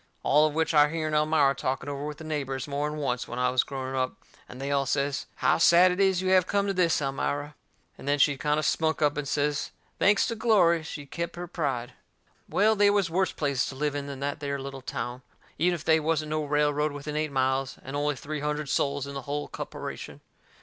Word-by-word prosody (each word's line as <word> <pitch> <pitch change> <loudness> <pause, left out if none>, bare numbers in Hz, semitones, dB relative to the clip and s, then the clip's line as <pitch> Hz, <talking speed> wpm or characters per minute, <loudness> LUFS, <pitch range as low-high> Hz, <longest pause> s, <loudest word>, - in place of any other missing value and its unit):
All 150 +2 +5
of 150 - -5
which 160 +1 +1
I 150 -1 +6
hearn 155 0 -3
Elmira 150 -2 +3
talking 135 +1 -3
over 140 0 -4
with 150 -1 -6
the 160 - -10
neighbours 140 -4 -3
more'n 145 +1 -2
once 125 -4 -2
when 120 - -6
I 125 0 +2
was 130 - +3
growing 130 -1 -5
up, 130 -1 -1 0.3
and 125 - -10
they 140 +1 -3
all 140 -1 +1
says: 140 0 -1
"How - - +2
sad 175 +2 +6
it 180 - -3
is 190 -2 +3
you 185 - 0
have 185 -1 +4
came 200 0 +1
to 200 - 0
this, 170 -5 +2
Elmira!" 145 +2 -2 0.5
And - - -10
then 145 0 +2
she'd 140 -1 +3
kind 150 0 +1
o' 155 - 0
spunk 160 0 +1
up 145 -1 +3
and 145 -1 -3
say, 145 +1 +1 0.5
thanks 205 +1 +4
to 230 - -2
glory, 195 -8 +4
she'd 145 -3 -8
kep' 170 0 -4
her 175 0 -5
pride. 140 -8 -3 0.6
Well, 215 +2 +3
they 205 0 +5
was 200 -5 +1
worse 185 +1 +1
places 140 -3 -1
to 135 - -7
live 145 +1 -1
in 145 -1 -4
than 140 -1 -7
that 145 +1 -2
there 140 -1 -2
little 135 0 -7
town, 125 -1 -5 0.4
even 175 +2 +3
if 165 - -8
they 160 0 +5
wasn't 155 -1 -1
no 155 -1 -1
railroad 150 0 +1
within 145 +1 -6
eight 155 -1 -1
miles, 130 0 0
and 135 +2 -6
only 145 0 0
three 150 +3 -5
hundred 150 0 -2
soles 140 0 0
in 140 - -7
the 140 - -4
hull 145 +3 -4
copperation. - - -7
150 Hz, 230 wpm, -27 LUFS, 140-160 Hz, 0.6 s, I